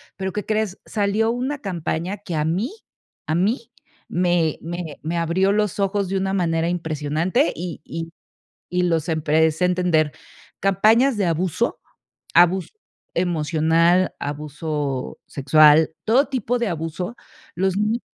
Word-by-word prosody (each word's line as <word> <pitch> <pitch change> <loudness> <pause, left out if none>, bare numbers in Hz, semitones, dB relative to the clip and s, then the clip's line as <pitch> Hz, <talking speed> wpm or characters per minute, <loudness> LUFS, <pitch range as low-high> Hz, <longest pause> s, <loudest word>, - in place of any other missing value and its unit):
pero, 190 -1 -4
¿qué 210 - -3
crees?, 215 -3 -1
salió 210 +1 +1
una 260 +4 -2
campaña 180 - -3
que 190 -3 -7
a 150 -1 0
mí, 185 - -1 0.6
a 155 - 0
mí 215 - 0 0.4
me 175 -3 +1
me 170 -2 -6
me 170 +2 -2
abrió 170 +4 +2
los 210 -1 0
ojos 195 -1 0
de 195 - 0
una 190 0 -1
manera 165 -3 +1
impresionante 160 0 0
y 170 -2 -6
y 165 0 -6 0.6
y 180 0 0
los 165 -3 +1
empecé 160 +1 +2
entender. 175 -4 +2 0.5
Campañas 220 +7 +4
de 200 - +1
abuso, 170 0 0 0.5
abuso 175 +2 +4 0.4
emocional, 165 +1 +2
abuso 145 -1 -4
sexual, 155 +3 +5
todo 250 +6 +4
tipo 245 -2 -1
de 235 -3 0
abuso, 165 +5 -4 0.4
los 190 +1 +1
ni 215 +3 0
175 Hz, 130 wpm, -22 LUFS, 160-200 Hz, 0.6 s, sexual